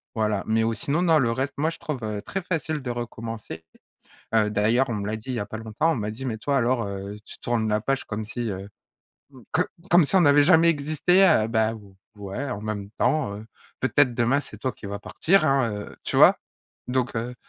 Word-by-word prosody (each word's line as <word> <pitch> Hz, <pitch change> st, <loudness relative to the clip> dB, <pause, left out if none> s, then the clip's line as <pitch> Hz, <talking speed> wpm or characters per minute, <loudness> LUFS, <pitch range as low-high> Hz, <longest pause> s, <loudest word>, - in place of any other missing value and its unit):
voilà, 105 Hz, -3 st, 0 dB
mais 110 Hz, +1 st, +2 dB
ou 115 Hz, 0 st, +1 dB
sinon 155 Hz, +6 st, 0 dB
non, 165 Hz, -3 st, +4 dB
le 120 Hz, -4 st, +2 dB
reste 130 Hz, +4 st, -2 dB
moi 155 Hz, +2 st, +2 dB
je 165 Hz, -, -7 dB
trouve, 150 Hz, -4 st, -4 dB
heu, 105 Hz, -1 st, -3 dB
très 195 Hz, -, -4 dB
facile 160 Hz, -4 st, -3 dB
de 130 Hz, -, -5 dB
recommencer, 115 Hz, -7 st, -6 dB, 0.7 s
heu, 105 Hz, -1 st, +3 dB
d'ailleurs 110 Hz, +6 st, +2 dB
on -, -, -1 dB
me 100 Hz, -2 st, -3 dB
l'a 105 Hz, -, -2 dB
dit 110 Hz, +4 st, -12 dB
il -, -, -2 dB
y -, -, -2 dB
a 100 Hz, -, -3 dB
pas 110 Hz, -, -6 dB
longtemps, 110 Hz, +9 st, 0 dB
on -, -, 0 dB
m'a 105 Hz, -3 st, -3 dB
dit: 115 Hz, +5 st, -8 dB
«Mais 115 Hz, -4 st, -2 dB
toi 140 Hz, +6 st, -1 dB
alors, 120 Hz, -1 st, +1 dB
heu, 100 Hz, +1 st, -6 dB
tu -, -, -11 dB
tournes 115 Hz, -2 st, -1 dB
la 105 Hz, 0 st, +1 dB
page 135 Hz, +3 st, -1 dB
comme 105 Hz, 0 st, -4 dB
si, 120 Hz, +1 st, -4 dB
heu, 95 Hz, +1 st, -7 dB, 0.8 s
co 180 Hz, -, +2 dB, 0.3 s
comme 175 Hz, -3 st, +6 dB
si 190 Hz, -, +2 dB
on 185 Hz, -, +6 dB
n'avait 145 Hz, -1 st, +6 dB
jamais 165 Hz, 0 st, +6 dB
existé», 155 Hz, +5 st, +2 dB
heu, 135 Hz, -, +4 dB
bah 110 Hz, -1 st, +1 dB, 0.4 s
ouais, 100 Hz, +7 st, -5 dB
en 105 Hz, -4 st, -5 dB
même 105 Hz, -2 st, -4 dB
temps, 150 Hz, -10 st, +1 dB
heu, 105 Hz, +2 st, -10 dB, 0.3 s
peut-être 130 Hz, -1 st, +3 dB
demain, 120 Hz, +4 st, +2 dB
c'est -, -, -7 dB
toi 130 Hz, -, -2 dB
qui -, -, -11 dB
va 100 Hz, +1 st, -4 dB
partir 185 Hz, -, +2 dB
hein, 135 Hz, -4 st, +2 dB
heu, 105 Hz, 0 st, -7 dB
tu -, -, -2 dB
vois? -, -, +7 dB, 0.5 s
Donc, 125 Hz, -1 st, -1 dB
heu, 120 Hz, +2 st, -3 dB
120 Hz, 230 wpm, -25 LUFS, 110-145 Hz, 0.8 s, vois